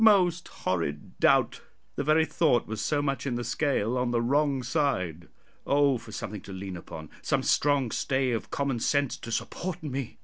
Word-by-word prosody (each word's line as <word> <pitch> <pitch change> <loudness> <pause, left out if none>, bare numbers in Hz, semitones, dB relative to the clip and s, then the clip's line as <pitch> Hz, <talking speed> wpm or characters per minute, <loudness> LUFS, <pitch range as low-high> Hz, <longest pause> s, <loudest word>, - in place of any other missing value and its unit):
Most 180 -5 +5
horrid 80 -5 -3
doubt! - - +3 0.3
the - - -1
very 155 +2 +4
thought 150 -7 +2
was 110 -2 -4
so 145 +7 +1
much 140 0 -1
in 125 - -1
the 120 - -2
scale 125 -2 0
on 125 -1 0
the 120 -1 +1
wrong 140 +2 +1
side. 90 - -1 0.4
Oh 140 -3 +3
for 110 - -12
something 105 -2 -5
to - - -10
lean 95 0 -6
upon 80 -2 -9
some - - 0
strong 140 -5 +2
stay 130 -1 0
of 115 - -3
common 140 -4 -1
sense 140 +2 +1
to 115 - -8
support 170 +9 -3
me! 135 -4 -4
130 Hz, 180 wpm, -28 LUFS, 110-145 Hz, 0.4 s, Most